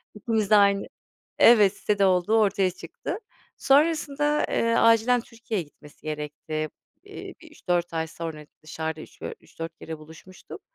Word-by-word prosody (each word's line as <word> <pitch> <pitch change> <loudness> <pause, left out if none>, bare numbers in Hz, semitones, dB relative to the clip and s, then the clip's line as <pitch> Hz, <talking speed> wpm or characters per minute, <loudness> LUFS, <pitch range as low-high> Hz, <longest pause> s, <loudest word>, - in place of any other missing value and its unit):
İkimiz 215 -1 -1
de 215 - +6
aynı, 200 -1 +4 0.5
evet 210 -5 +6
sitede 205 -1 +1
olduğu 185 +4 +3
ortaya 195 -2 +2
çıktı. 180 - -7 0.4
Sonrasında, 295 0 +2
eee, 230 0 +1
acilen 230 +2 +4
Türkiye'ye 230 -5 -5
gitmesi 145 0 -19
gerekti. 155 0 -4 0.4
Eee - - -9
bir - - -14
üç - - -18
3-4 170 -2 -1
sonra 160 -3 -7 0.2
dışarıda 160 0 -5
3 - - -14
dö - - -4
3-4 165 0 -9
kere 160 -1 -7
buluşmuştuk. 160 +4 -13
190 Hz, 140 wpm, -25 LUFS, 160-230 Hz, 0.5 s, de